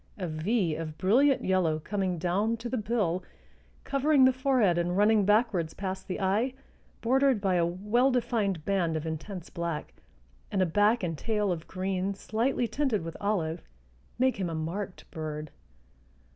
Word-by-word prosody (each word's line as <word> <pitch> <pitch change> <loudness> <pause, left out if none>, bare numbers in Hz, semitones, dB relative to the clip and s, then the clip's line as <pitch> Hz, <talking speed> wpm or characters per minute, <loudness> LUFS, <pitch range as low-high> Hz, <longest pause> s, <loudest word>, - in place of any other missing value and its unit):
A 190 - -3
V 170 +3 0
of 155 -1 -6
brilliant 260 - +3
yellow 180 -4 +2
coming 185 +2 -2
down 195 +7 0
to 235 +2 -6
the 255 - -2
bill, 205 -6 0 0.6
covering 275 0 +3
the 260 - +5
forehead 250 -9 +2
and 175 +1 0
running 210 0 +4
backwards 205 -6 +2
past 190 -1 -5
the 185 - -3
eye, 210 +7 +1 0.5
bordered 265 0 +3
by 195 -2 +1
a 170 -1 +3
well 210 +9 +1
defined 215 - 0
band 175 -5 +1
of 155 - -5
intense 165 +3 -6
black, 170 -3 -4 0.6
and 195 - 0
a 185 - +4
back 205 +6 +2
and 165 -2 -1
tail 210 +3 0
of 170 -2 -4
green 190 +1 -2
slightly 235 +5 0
tinted 260 - 0
with 165 0 -6
olive 175 -5 -1 0.6
make 260 0 +2
him 185 -3 -2
a 165 - -4
marked 180 +5 -4
bird. 155 -2 -5
195 Hz, 160 wpm, -29 LUFS, 170-230 Hz, 0.6 s, the